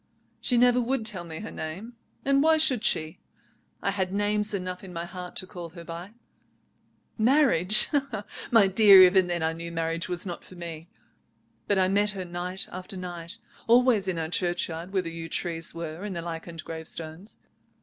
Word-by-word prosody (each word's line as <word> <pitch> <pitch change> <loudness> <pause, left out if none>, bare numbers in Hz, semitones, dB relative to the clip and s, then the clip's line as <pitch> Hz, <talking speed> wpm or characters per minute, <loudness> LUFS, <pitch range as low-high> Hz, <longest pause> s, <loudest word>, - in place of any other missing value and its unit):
"She 245 - 0
never 245 +1 +4
would 245 -1 -1
tell 200 -6 -2
me 160 0 -7
her 220 - -7
name, 175 +10 -6 0.3
and 275 0 +3
why 320 +1 +4
should 260 -7 +2
she? 155 -7 -1 0.6
I 195 - +1
had 190 -2 -2
names 205 +1 +1
enough 185 -2 -4
in 190 - -9
my 170 -1 -4
heart 180 0 -8
to - - +5
call 175 -3 -8
her 170 +1 -11
by. 175 +5 -8 1.0
Marriage? 220 - +5 0.6
My 225 -5 +6
dear, 195 -1 +8
even 185 0 +5
then 175 -2 -2
I 160 0 0
knew 170 +1 -7
marriage 165 +1 -2
was 180 +2 -3
not 175 -3 -6
for 185 - -13
me. 170 -1 -8 0.8
But 205 - +2
I 185 -1 +3
met 205 +2 +1
her 190 -2 -5
night 180 +2 -4
after 185 +1 -6
night, 175 -2 -7 0.3
always 235 -4 +4
in 185 -2 -1
our 160 -1 -3
churchyard 175 0 -2
where 190 -2 0
the 165 - -5
yew 165 0 -7
trees 165 -2 -2
were 165 +1 -6
and 205 -3 -5
the 170 - -4
lichened 165 -1 -7
gravestones. 160 +4 -6
180 Hz, 180 wpm, -27 LUFS, 170-205 Hz, 1.0 s, dear